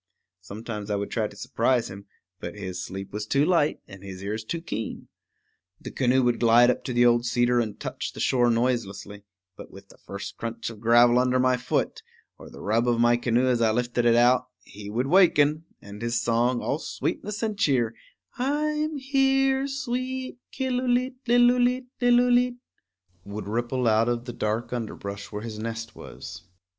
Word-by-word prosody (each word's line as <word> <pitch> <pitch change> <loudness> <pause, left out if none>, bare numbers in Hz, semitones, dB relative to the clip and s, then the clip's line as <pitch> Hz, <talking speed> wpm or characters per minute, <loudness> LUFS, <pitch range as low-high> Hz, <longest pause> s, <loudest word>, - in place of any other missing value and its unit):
Sometimes 105 +2 -7
I 105 - 0
would 100 0 -4
try 110 -3 0
to 105 - -14
surprise 125 +1 0
him; 100 +1 -11 0.3
but - - -7
his 95 -3 -5
sleep 95 +1 -7
was 105 0 -4
too 140 +4 +2
light 165 -4 +2
and 100 -1 -12
his 95 -1 -9
ears 105 +2 -3
too 170 +9 -4
keen. 115 -10 -6 0.7
The - - -8
canoe 130 0 +2
would 120 -1 +1
glide 120 +1 +6
up - - -5
to 125 - -3
the 120 0 +4
old 120 0 +4
cedar 120 0 +2
and 110 -3 -3
touch - - -5
the - - -10
shore 120 -2 +2
noiselessly; 115 -4 -2 0.3
but - - -11
with 100 0 -14
the - - -19
first 100 0 -8
crunch 115 0 -5
of 110 - -12
gravel 120 +2 +5
under 125 0 +2
my 130 0 +3
foot, 125 - -2 0.4
or - - -11
the - - -12
rub 115 +4 +1
of 120 -1 +2
my 120 0 +4
canoe 120 +1 +1
as 125 -2 +1
I 115 - +4
lifted 120 +1 0
it 115 -1 +5
out, 125 +2 +4 0.2
he 100 0 -10
would 120 +5 -1
waken; 155 -2 +4 0.2
and 100 +1 -10
his 115 0 0
song, 120 +1 +1
all 145 - -1
sweetness 210 +5 -4
and 215 -2 -1
cheer, 130 - +1 0.5
I'm 300 +3 -1
here, 270 0 +2
sweet 260 -1 -4
Killooleet 255 0 -1
lillooleet 245 +1 +3 0.2
lillooleet, 245 0 +4 0.7
would 100 +1 -7
ripple 120 +3 -1
out 110 +1 +3
of 120 0 -2
the 120 - -6
dark 110 +3 -2
underbrush 100 -4 -6
where 105 0 -5
his 110 -2 -6
nest 115 0 -5
was. - - -10
120 Hz, 180 wpm, -25 LUFS, 110-180 Hz, 0.7 s, glide